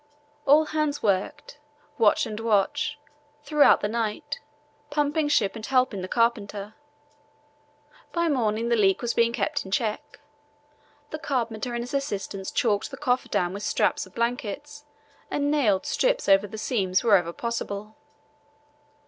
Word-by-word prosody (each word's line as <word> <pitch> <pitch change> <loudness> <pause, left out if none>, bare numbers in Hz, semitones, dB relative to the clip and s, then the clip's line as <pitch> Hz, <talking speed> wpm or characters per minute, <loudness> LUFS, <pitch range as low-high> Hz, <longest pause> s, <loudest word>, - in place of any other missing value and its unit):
All 300 +3 +6
hands 305 -2 -1
worked, 200 +7 -1 0.4
watch 215 -2 +4
and 215 -2 -5
watch, 230 +7 +1 0.5
throughout 295 0 +5
the 205 - 0
night, 235 +6 -3 0.5
pumping 295 +1 +1
ship 230 -9 +2
and 220 - -8
helping 255 -6 +1
the 185 - -4
carpenter. 210 -2 -1 1.4
By 340 -1 0
morning 230 -5 0
the 235 - +3
leak 195 -2 +2
was 235 - 0
being 235 0 +3
kept 290 +5 -1
in 190 - -10
check. 215 +2 -2 0.9
The 310 - -4
carpenter 240 -5 -2
and 235 - -2
his 245 - -8
assistants 200 -8 -3
caulked 210 -4 0
the 270 - -8
coffer 255 -3 0
dam 175 0 0
with 200 - -6
strips 205 - 0
of 185 - -21
blankets 245 +5 -3 0.4
and 290 0 0
nailed 225 -11 +2
strips - - +1
over 195 +1 +5
the 220 - -8
seams 195 -6 0
wherever 195 -7 +4
possible. 215 0 -4
235 Hz, 140 wpm, -26 LUFS, 205-285 Hz, 1.4 s, All